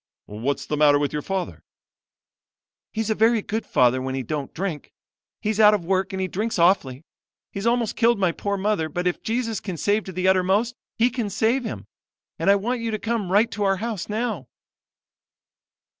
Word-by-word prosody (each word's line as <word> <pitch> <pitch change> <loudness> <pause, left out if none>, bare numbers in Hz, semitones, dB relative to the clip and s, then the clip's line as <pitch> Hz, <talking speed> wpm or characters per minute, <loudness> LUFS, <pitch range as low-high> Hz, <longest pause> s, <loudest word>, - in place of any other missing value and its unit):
"'What's 115 +7 -3
the 150 - -2
matter 145 -1 +5
with 145 0 -1
your 150 - -2
father?' 190 +2 -4 1.3
"'He's 220 0 -2
a - - +4
very 225 0 +3
good 220 +1 -3
father 125 +1 +3
when 130 0 -3
he 135 - -2
don't 140 +2 -4
drink. 170 -5 -4 0.5
He's 215 0 -1
out 210 -1 +7
of 185 -5 -4
work 190 +1 0
and 190 - -4
he 190 - 0
drinks 215 +5 -2
awfully. 165 -6 +2 0.5
He's 200 +3 -3
almost 235 -2 +1
killed 235 -1 +3
my 190 -3 +2
poor 200 +4 -3
mother; 190 -5 0
but 175 +4 -3
if 180 - 0
Jesus 225 -2 -2
can 190 -4 -6
save 205 +5 +1
to 190 - -6
the 185 +1 -1
uttermost, 190 +5 +2 0.2
He 240 +2 +3
can 235 -4 -2
save 225 +5 +1
him. - - -5 0.5
And - - +1
I 200 - +7
want 235 +5 -2
you 230 - -2
to 215 - -1
come 220 -4 -2
right 210 +4 +3
to 210 - -5
our 195 -1 +2
house 215 -2 -4
now.' 215 - -2
200 Hz, 195 wpm, -23 LUFS, 175-220 Hz, 1.3 s, out